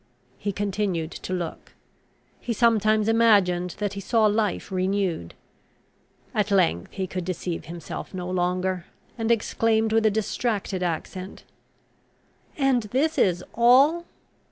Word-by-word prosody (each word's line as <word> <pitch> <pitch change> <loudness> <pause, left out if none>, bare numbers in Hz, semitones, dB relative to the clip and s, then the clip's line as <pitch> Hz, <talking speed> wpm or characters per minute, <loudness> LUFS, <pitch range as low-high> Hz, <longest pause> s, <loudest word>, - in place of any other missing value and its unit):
He 205 - -2
continued 195 -4 -2
to - - -7
look; 180 -3 -5 0.7
he 240 - -3
sometimes 215 -2 +3
imagined 200 -6 +3
that 205 -1 -2
he 200 - -5
saw 225 +3 +2
life 210 -3 0
renewed. 185 - -1 1.0
At 210 0 0
length 180 - +1
he 190 -1 -2
could 185 0 -4
deceive 175 -2 -4
himself 170 +2 -7
no 180 -2 -5
longer, 180 0 -1 0.3
and 225 -1 -2
exclaimed 225 -1 +1
with 220 0 +4
a - - +5
distracted 210 -2 -2
accent, 180 +2 -4 1.1
"And 270 -5 +2
is 310 +4 +2
this 180 - +2
all?" 270 +9 +5
200 Hz, 125 wpm, -25 LUFS, 180-225 Hz, 1.1 s, a